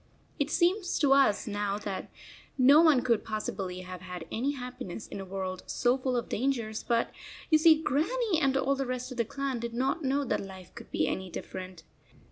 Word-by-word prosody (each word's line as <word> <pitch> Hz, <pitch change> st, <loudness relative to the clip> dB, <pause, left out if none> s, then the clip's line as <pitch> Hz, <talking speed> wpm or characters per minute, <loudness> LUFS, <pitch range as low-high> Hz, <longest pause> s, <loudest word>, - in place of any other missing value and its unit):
It 285 Hz, 0 st, +1 dB
seems 360 Hz, +3 st, +2 dB
to 280 Hz, -3 st, +4 dB
us 270 Hz, -7 st, +4 dB
now 205 Hz, -1 st, -1 dB
that 200 Hz, -2 st, -5 dB, 0.5 s
no 280 Hz, +4 st, +7 dB
one 305 Hz, -7 st, +5 dB
could 235 Hz, -4 st, +2 dB
possibly 195 Hz, -4 st, -4 dB
have 180 Hz, -1 st, -8 dB
had 180 Hz, -2 st, -7 dB
any 265 Hz, +6 st, 0 dB
happiness 250 Hz, -6 st, -7 dB
in -, -, -7 dB
a 195 Hz, -, -6 dB
world 190 Hz, -1 st, -4 dB
so 245 Hz, 0 st, +2 dB
full 255 Hz, -1 st, -1 dB
of 235 Hz, -, -2 dB
dangers, 230 Hz, -3 st, -1 dB
but 235 Hz, -1 st, 0 dB, 0.4 s
you 310 Hz, -, +6 dB
see 315 Hz, 0 st, +7 dB
Grannie 345 Hz, -, +1 dB
and 270 Hz, -2 st, +3 dB
all 275 Hz, +1 st, +2 dB
the 270 Hz, -1 st, -2 dB
rest 255 Hz, +1 st, -3 dB
of 255 Hz, -, -7 dB
the 235 Hz, -, +1 dB
clan 275 Hz, +1 st, -3 dB
did 235 Hz, 0 st, -5 dB
not 270 Hz, +6 st, 0 dB
know 275 Hz, +1 st, +1 dB
that -, -, 0 dB
life 190 Hz, -2 st, -11 dB
could -, -, -11 dB
be -, -, 0 dB
any 190 Hz, 0 st, -3 dB
different. 185 Hz, 0 st, -7 dB
250 Hz, 200 wpm, -29 LUFS, 200-275 Hz, 0.5 s, no